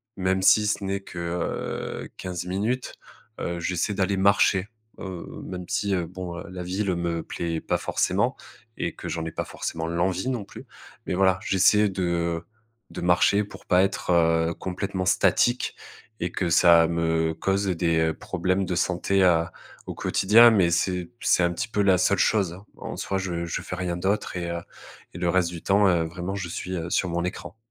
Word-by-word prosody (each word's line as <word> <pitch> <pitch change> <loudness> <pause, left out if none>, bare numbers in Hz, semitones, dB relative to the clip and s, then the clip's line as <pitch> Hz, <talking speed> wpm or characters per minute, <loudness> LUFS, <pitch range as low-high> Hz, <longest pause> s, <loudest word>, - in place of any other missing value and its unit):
même 95 0 0
si 105 +3 +5
ce 105 - -1
n'est 95 0 -2
que, 90 -2 -9
heu, 85 0 -4
15 90 -1 -5
minutes, 110 +8 -2 0.5
heu, 85 0 -3
j'essaie 90 +4 -1
d'aller 100 0 0
marcher, 100 0 +3 0.3
heu, 95 -3 -6 0.2
même 90 -1 -6
si, 100 0 -1
heu, 90 -2 0
bon, 90 0 -7
la 90 -1 -6
ville 95 +1 -1
me 85 -1 -2
plaît 85 -1 -3
pas - - 0
forcément - - 0 0.4
et - - -3
que - - -7
j'en 80 -1 -3
ai 80 - -4
pas - - -3
forcément 80 0 -4
l'envie 90 +6 0
non 120 -6 -3
plus. - - -12 0.4
Mais - - -2
voilà, 95 0 +3
j'essaie 105 +2 +4
de 85 -2 -1 0.5
de - - -6
marcher 90 +4 +3
pour 105 - -13
pas 90 0 +4
être 85 -3 +2
complètement 95 0 -4
statique 120 +5 +2 0.5
et 85 0 -1
que 90 -3 -1
ça 85 0 +6
me 80 -1 0
cause 100 +1 0
des 80 -2 +1
problèmes 95 +4 -1
de 90 - -2
santé, 90 +2 +1
heu, 85 -2 +4 0.4
au - - -5
quotidien. 115 +5 +6
Mais 95 -6 +3
c'est 90 +1 0
c'est 90 - +3
un 85 - +2
petit - - -3
peu 105 -2 -1
la 95 -2 +4
seule 100 - +3
chose, 95 -5 +2
hein. 95 - -14
En - - -7
soi, 95 - -2
je 85 -3 -3
je 80 - -3
fais - - -6
rien 90 -1 -2
d'autre 95 +3 -1
et 85 -1 -3 0.6
et - - -8
le 90 -1 0
reste 90 -1 +2
du 85 -2 -7
temps, 100 0 +3
heu, 85 -3 +2
vraiment, 85 +3 -5
je 90 -3 -4
suis, 90 +2 -4
heu, 85 0 -4
sur 90 0 0
mon 85 0 -1
écran. 90 +4 -6
90 Hz, 185 wpm, -25 LUFS, 85-95 Hz, 0.6 s, ça